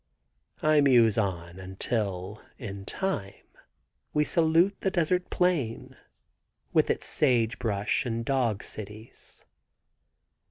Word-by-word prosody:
I 155 -1 +5
muse 120 -6 +5
on 90 -4 -2
until 95 +1 -3 0.2
in 100 -5 -7
time 105 - -3 0.8
we 150 - +4
salute 165 +5 +3
the 190 - +1
desert 180 0 0
plain, 165 -11 -1 0.8
with - - +3
its - - -1
sage 120 -6 +1
brush 105 -3 0
and 115 -2 -3
dog 120 -6 0
cities. 110 +2 -8
115 Hz, 105 wpm, -28 LUFS, 100-155 Hz, 0.8 s, I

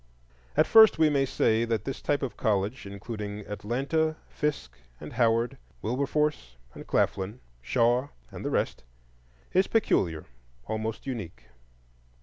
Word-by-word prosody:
And 155 - +6
first 220 -1 +7
we 160 -1 +4
may 140 -1 +2
say 110 -2 +2
that 115 -2 -1
this 135 - -4
type 145 -1 0
of 130 - -3
college, 105 +2 -1
including 105 +1 -6
Atlanta, 130 +11 -1
Fisk, 145 - -3 0.2
and 75 - -9
Howard, 115 0 +2 0.2
Wilberforce 135 - -1 0.2
and - - -10
Claflin, 100 +4 0 0.2
Shaw, 120 - +2 0.2
and - - -8
the - - -1
rest, - - -1 0.7
is 190 +1 +4
peculiar, 85 - +1 0.4
almost 110 0 -4
unique. 95 - -6
115 Hz, 130 wpm, -28 LUFS, 105-140 Hz, 0.7 s, first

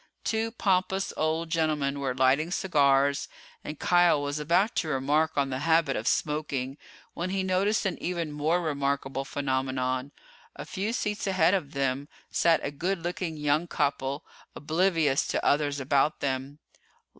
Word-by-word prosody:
Two 225 0 0
pompous 190 -3 0
old 160 +1 -1
gentlemen 150 -4 0
were 135 -2 -2
lighting 135 +5 +3
cigars 140 -5 +2 0.4
and 150 - -7
Kial 175 -3 +4
was 145 +1 -2
about 175 +9 +2
to - - 0
remark 150 +3 +1
on 140 -1 +1
the 130 - -2
habit 165 +2 +2
of - - -3
smoking 145 -3 -1 0.3
when 175 +2 -3
he 190 0 -1
noticed 195 +4 +1
an 190 - -2
even 170 -3 -2
more 155 +4 +1
remarkable 140 -3 -2
phenomenon. 130 -1 -2 0.4
A - - -7
few 200 +3 -3
seats 210 -4 -2
ahead 185 -2 +3
of 165 -7 -1
them 135 0 -1 0.2
sat 165 -1 +3
a 140 - -2
good 180 +7 -1
looking 175 -2 -3
young 150 +3 +1
couple, 140 -2 -1 0.3
oblivious 160 -2 +1
to - - -2
others 145 -1 +2
about 140 +2 +1
them. 135 +1 -3
150 Hz, 150 wpm, -27 LUFS, 140-175 Hz, 0.4 s, Kial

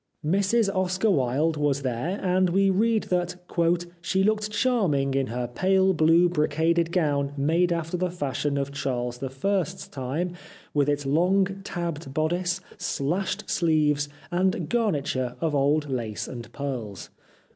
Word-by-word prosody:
Mrs 200 +4 +2
Oscar 185 +3 +1
Wilde 145 +2 +1
was 145 -2 0
there, 130 - -2
and 185 0 +2
we 195 +2 +3
read 220 +3 +2
that 180 0 0 0.6
' 170 - -33
she 190 +2 +1
looked 215 +1 +1
charming 195 - +1
in 135 -1 +1
her 125 +1 -3
pale 190 +8 +2
blue 165 +2 +5
brocaded 165 +1 +1
gown 145 -5 +1
made 165 +5 +2
after 170 +1 -1
the 180 +1 0
fashion 145 -3 -2
of 140 0 -2
Charles 125 -3 -3
I.'s 145 +7 -2
time, 145 +7 -3 0.4
with 145 -1 +2
its 145 -1 0
long 190 +6 +2
tabbed 165 -6 -5
bodice, 175 +4 0 0.2
slashed 175 +7 -2
sleeves, 150 -3 +2 0.2
and 180 -2 +1
garniture 140 - 0
of 160 -2 -1
old 145 +2 +2
lace 115 -6 -3
and 120 -2 -8
pearls.' 120 -9 -5
160 Hz, 140 wpm, -26 LUFS, 140-185 Hz, 0.6 s, blue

